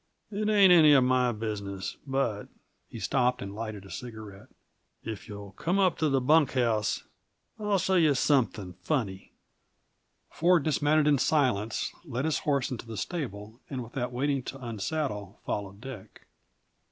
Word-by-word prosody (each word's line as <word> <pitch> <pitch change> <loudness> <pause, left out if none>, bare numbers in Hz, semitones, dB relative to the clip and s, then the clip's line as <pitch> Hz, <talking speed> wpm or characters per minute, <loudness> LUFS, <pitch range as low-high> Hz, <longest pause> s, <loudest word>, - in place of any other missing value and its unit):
"It 210 +1 -1
ain't 200 -4 +7
any 155 -4 +7
of 135 -2 +6
my 125 -1 +3
business, 100 -4 -4
but 135 -6 -1 0.2
" - - -46
He - - -8
stopped 125 0 +1
and 100 0 -6
lighted 110 -2 -6
a 95 - -12
cigarette. 110 -1 -9 0.6
"If 110 -2 -6
you'll 100 -1 -8
come 170 - -1
up 185 -4 +2
to 155 -1 +2
the 135 -1 +2
bunk 145 +2 +4
house, 115 -5 +1 0.6
I'll 210 -1 +1
show 190 +1 0
you 155 -5 +4
something 115 -9 +1
funny!" 100 -11 -2 1.0
Ford 170 -1 +3
dismounted 155 0 +2
in 145 -2 +4
silence, 125 -8 +1
led 135 -4 -3
his 160 - +1
horse 140 -4 0
into 120 -2 -6
the 110 -2 -6
stable, 110 - -5
and 130 -3 -4
without 125 +1 -4
waiting 135 +2 0
to 135 - -6
unsaddle, 110 - -3
followed 100 -1 -4
Dick. 125 -5 -10
125 Hz, 155 wpm, -28 LUFS, 105-150 Hz, 1.0 s, ain't